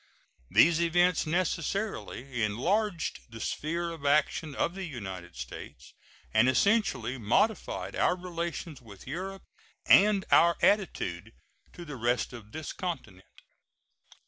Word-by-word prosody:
These 155 Hz, -, +5 dB
events 175 Hz, 0 st, +3 dB
necessarily 160 Hz, -, -2 dB
enlarged 170 Hz, -, 0 dB
the 115 Hz, 0 st, -10 dB
sphere 170 Hz, +7 st, -2 dB
of 165 Hz, -3 st, -9 dB
action 150 Hz, +1 st, +1 dB
of 170 Hz, -, 0 dB
the 195 Hz, 0 st, -5 dB
United 95 Hz, -, -7 dB
States, 60 Hz, -, -9 dB, 0.4 s
and 110 Hz, +4 st, +5 dB
essentially 135 Hz, -, +1 dB
modified 180 Hz, -, 0 dB
our 180 Hz, -, +2 dB
relations 170 Hz, -4 st, -5 dB
with 100 Hz, -5 st, -13 dB
Europe 190 Hz, +7 st, -5 dB, 0.4 s
and 200 Hz, -1 st, +5 dB
our 170 Hz, 0 st, +6 dB
attitude 115 Hz, -, +1 dB, 0.4 s
to 175 Hz, -, -9 dB
the 145 Hz, -4 st, -7 dB
rest 120 Hz, +2 st, 0 dB
of 110 Hz, -3 st, -11 dB
this 155 Hz, +2 st, -6 dB
continent. 130 Hz, -, -6 dB
155 Hz, 120 wpm, -29 LUFS, 115-180 Hz, 0.4 s, our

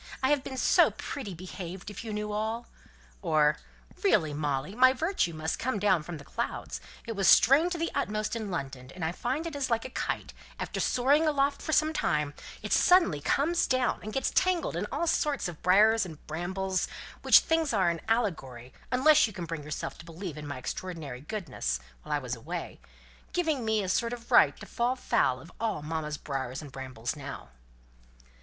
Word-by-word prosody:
I 260 Hz, -, +3 dB
have 290 Hz, -2 st, +2 dB
been 260 Hz, -, -6 dB
so -, -, +5 dB
pretty 210 Hz, -10 st, -6 dB
behaved 185 Hz, +2 st, -7 dB
if 205 Hz, -, -7 dB
you 225 Hz, -, -5 dB
knew 210 Hz, 0 st, -3 dB
all!" 220 Hz, +3 st, -2 dB, 0.6 s
Or, 155 Hz, -4 st, +3 dB, 0.5 s
"Really, 170 Hz, -, +3 dB
Molly, 145 Hz, +3 st, -2 dB
my 255 Hz, +3 st, +6 dB
virtue 320 Hz, -, 0 dB
must 160 Hz, 0 st, -3 dB
come 260 Hz, -2 st, -1 dB
down 195 Hz, -4 st, +3 dB
from 160 Hz, +1 st, -7 dB
the 145 Hz, -, -11 dB
clouds! -, -, -4 dB, 0.2 s
It 230 Hz, -, -4 dB
was 195 Hz, -2 st, +1 dB
strained 280 Hz, -, +6 dB
to -, -, -3 dB
the 330 Hz, 0 st, -1 dB
utmost 215 Hz, +1 st, -1 dB
in 220 Hz, -3 st, -4 dB
London 135 Hz, -7 st, -5 dB
and 175 Hz, -3 st, -3 dB
I 160 Hz, -, 0 dB
find 255 Hz, -, -2 dB
it 330 Hz, -3 st, -5 dB
is 280 Hz, -2 st, -1 dB
like 230 Hz, 0 st, 0 dB
a 260 Hz, -, -6 dB
kite -, -, -3 dB, 0.3 s
after -, -, -3 dB
soaring 285 Hz, +6 st, +3 dB
aloft 280 Hz, -1 st, +1 dB
for -, -, -3 dB
some 310 Hz, 0 st, +3 dB
time, 150 Hz, -, 0 dB, 0.3 s
it -, -, -1 dB
suddenly 340 Hz, -, +5 dB
comes 330 Hz, -, +2 dB
down, 255 Hz, -1 st, +1 dB
and 215 Hz, -, -6 dB
gets 270 Hz, -, 0 dB
tangled 370 Hz, -2 st, +1 dB
in -, -, -2 dB
all 340 Hz, -, 0 dB
sorts 295 Hz, -, +1 dB
of 170 Hz, -3 st, -8 dB
briars 215 Hz, +5 st, +5 dB
and 160 Hz, -5 st, -9 dB
brambles; 185 Hz, +3 st, -2 dB, 0.3 s
which -, -, +8 dB
things 325 Hz, -2 st, +1 dB
are 190 Hz, -6 st, +3 dB
an 165 Hz, -, -5 dB
allegory, 135 Hz, -, -1 dB, 0.2 s
unless 295 Hz, +3 st, +6 dB
you 215 Hz, -, -9 dB
can 175 Hz, -2 st, -5 dB
bring 165 Hz, -2 st, -5 dB
yourself 150 Hz, +1 st, -5 dB
to 170 Hz, -, -11 dB
believe 170 Hz, 0 st, -7 dB
in 150 Hz, -1 st, -7 dB
my 140 Hz, -2 st, -5 dB
extraordinary 145 Hz, -1 st, -5 dB
goodness 145 Hz, -, -3 dB, 0.2 s
while -, -, -9 dB
I 150 Hz, -, +3 dB
was 125 Hz, -3 st, -4 dB
away 165 Hz, +9 st, -6 dB, 0.5 s
giving 320 Hz, -7 st, 0 dB
me 220 Hz, -2 st, +1 dB
a -, -, -3 dB
sort 230 Hz, +5 st, +1 dB
of 240 Hz, -1 st, -9 dB
right -, -, +6 dB
to -, -, -7 dB
fall 245 Hz, +1 st, 0 dB
foul 130 Hz, -, +1 dB
of 165 Hz, +6 st, -13 dB
all 220 Hz, -10 st, -1 dB
mamma's 150 Hz, -1 st, -3 dB
briars 135 Hz, -3 st, -4 dB
and 145 Hz, -3 st, -9 dB
brambles 130 Hz, -2 st, -5 dB
now." 140 Hz, -, -8 dB
195 Hz, 195 wpm, -29 LUFS, -, 0.6 s, which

